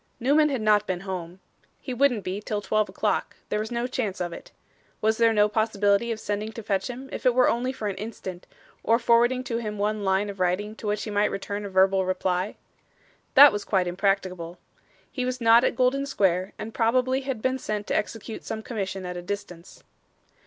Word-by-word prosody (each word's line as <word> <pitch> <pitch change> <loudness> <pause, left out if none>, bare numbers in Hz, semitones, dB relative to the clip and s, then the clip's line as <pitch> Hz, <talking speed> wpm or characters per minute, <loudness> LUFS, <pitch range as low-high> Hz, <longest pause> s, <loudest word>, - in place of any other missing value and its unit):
Newman 295 +5 +4
had 265 -5 -2
not 210 -1 +3
been 180 -2 -2
home. 185 -2 -6 0.4
He 255 - -5
wouldn't 245 -5 +2
be, 190 +3 -4
till 210 0 -2
twelve 215 +1 0
o'clock; - - -1
there 210 - 0
was 215 +1 -3
no 240 0 -2
chance 245 -6 -3
of 175 -1 -3
it. - - -10 0.5
Was 220 +1 +1
there 230 -1 +5
no 210 -1 +4
possibility 210 0 +1
of 220 - -3
sending 210 +1 -3
to 230 - -7
fetch 195 0 -1
him 255 +2 -7
if - - -6
it 250 -2 +3
were 250 0 +5
only 245 +2 0
for 220 -5 -5
an 200 - -2
instant, 190 -4 -7 0.4
or 230 +1 +4
forwarding 240 +2 +3
to 235 -3 -3
him 210 -2 -4
one 210 +1 -1
line 190 +1 +1
of 195 - -13
writing 185 +4 0
to 215 - -6
which 210 0 -1
he 215 - -5
might 205 0 +2
return 200 +1 -4
a - - -5
verbal 190 0 +3
reply? 185 +1 -1 0.8
That 285 +1 +10
was 205 0 -3
quite 190 -3 +1
impracticable. 180 -2 -1 0.5
He 255 - -3
was 255 0 -2
not 230 0 +6
at - - +1
Golden 265 +2 +1
Square, 190 -7 +1
and 220 +1 -7
probably 255 +3 +2
had 265 -3 -3
been 260 +3 -1
sent 210 -3 -3
to - - -2
execute 225 +1 -3
some 220 0 -5
commission 195 -5 -4
at 180 0 -5
a - - -5
distance. 180 -2 -7
210 Hz, 210 wpm, -26 LUFS, 195-235 Hz, 0.8 s, That